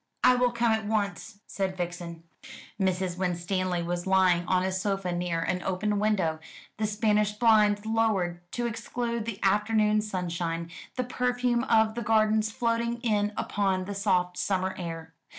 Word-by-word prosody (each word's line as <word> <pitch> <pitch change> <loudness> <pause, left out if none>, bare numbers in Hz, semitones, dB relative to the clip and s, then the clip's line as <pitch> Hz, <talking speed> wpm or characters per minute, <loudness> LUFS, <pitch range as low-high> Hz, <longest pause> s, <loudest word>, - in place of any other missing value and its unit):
"I - - +7
will 250 0 +3
come 235 -1 +1
at 220 -1 0
once," 205 -1 -2
said 190 -1 -3
Vixen. 170 -1 -5 0.6
Mrs. 185 -1 0
Winstanley 180 0 -1
was 175 +1 -3
lying 185 -2 +3
on 185 -1 +2
a 190 - 0
sofa 190 -1 -1
near 175 -1 -1
an 180 +2 -1
open 200 +3 -1
window, 190 -7 +1 0.4
the 215 0 0
Spanish 210 0 +1
blinds 210 -2 +3
lowered 215 -6 +1
to 240 - -2
exclude 235 0 -3
the 230 -3 -4
afternoon 210 +1 +3
sunshine, 170 -4 -3 0.2
the 255 - 0
perfume 245 -1 0
of 220 -2 +3
the 235 - -4
gardens 215 -1 +2
floating 235 +1 -1
in 210 -3 +1
upon 190 -2 0
the 200 - -5
soft 185 -3 0
summer 190 -1 0
air. 165 -2 -6
200 Hz, 150 wpm, -28 LUFS, 180-220 Hz, 0.6 s, I